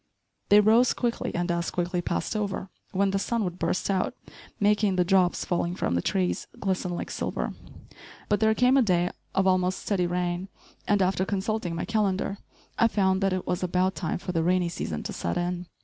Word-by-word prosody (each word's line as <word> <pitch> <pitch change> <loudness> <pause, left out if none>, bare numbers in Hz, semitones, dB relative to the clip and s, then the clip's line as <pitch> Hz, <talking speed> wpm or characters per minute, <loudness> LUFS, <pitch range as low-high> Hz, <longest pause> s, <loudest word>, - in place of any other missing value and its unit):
They 205 +1 +8
rose 225 +4 +5
quickly 240 -1 -1
and 175 +1 0
as 170 0 -1
quickly 175 0 -1
passed 175 - -2
over, 200 -2 -3 0.2
when 195 0 +1
the 195 - 0
sun 230 +2 -1
would 180 -1 -4
burst - - 0
out, 190 -2 0 0.4
making 205 -1 +3
the 180 - +3
drops 185 -1 +2
falling 175 0 -1
from 135 - -1
the 85 - +1
trees 185 - -1
glisten 185 -2 -1
like - - -5
silver. - - -3 0.7
But 205 - +2
there 220 0 +3
came 250 +3 +4
a - - +6
day 180 -5 +2 0.2
of 195 - +3
almost 185 0 +2
steady 185 -4 +1
rain, 175 +1 -2 0.4
and, 205 -2 +3
after 185 0 +1
consulting 195 -2 -2
my 170 - -2
calendar, 200 -2 0 0.4
I 230 - +6
found 190 -3 +1
that 195 0 +2
it 185 -1 -2
was 180 0 -1
about 185 +1 +1
time 175 -4 -2
for 180 - -5
the 165 -2 0
rainy 180 +1 +2
season 80 - -4
to - - -5
set 85 - -2
in. 175 0 -2
185 Hz, 195 wpm, -27 LUFS, 180-205 Hz, 0.7 s, They